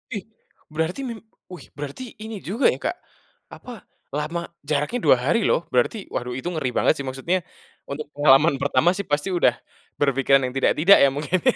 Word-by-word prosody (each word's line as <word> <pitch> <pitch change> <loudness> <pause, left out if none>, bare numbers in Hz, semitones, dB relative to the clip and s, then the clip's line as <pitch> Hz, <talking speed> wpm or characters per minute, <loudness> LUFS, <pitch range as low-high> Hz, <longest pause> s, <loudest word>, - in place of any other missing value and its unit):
Ih 200 - -4 0.5
berarti 160 - -2
mim 230 -2 -6 0.3
wih 175 -6 -10
berarti 145 - -6 0.2
ini 220 0 -6
juga 220 +9 -2
ya - - -6
Kak, - - -2 0.6
apa, 250 - -11 0.5
lama 160 +3 -2 0.3
jaraknya 150 +12 0
2 - - +7
hari 175 +11 +3
loh, - - +3
berarti 125 - +1 0.2
waduh 125 0 -3
itu 130 - -5
ngeri 155 -7 -2
banget - - +4
sih 140 - -4
maksudnya, 165 +8 -1 0.5
untuk 150 +2 -5
pengalaman 145 +1 +5
pertama 145 +4 +3
sih 200 - -3
pasti 145 +6 0
udah, 150 - +4 0.5
berpikiran 135 -1 +3
yang 125 - -8
tidak 135 - +3
tidak 190 +6 +7
ya 140 - +6
mungkin 150 +6 -1
ya. - - +3
150 Hz, 180 wpm, -23 LUFS, 135-180 Hz, 0.6 s, 2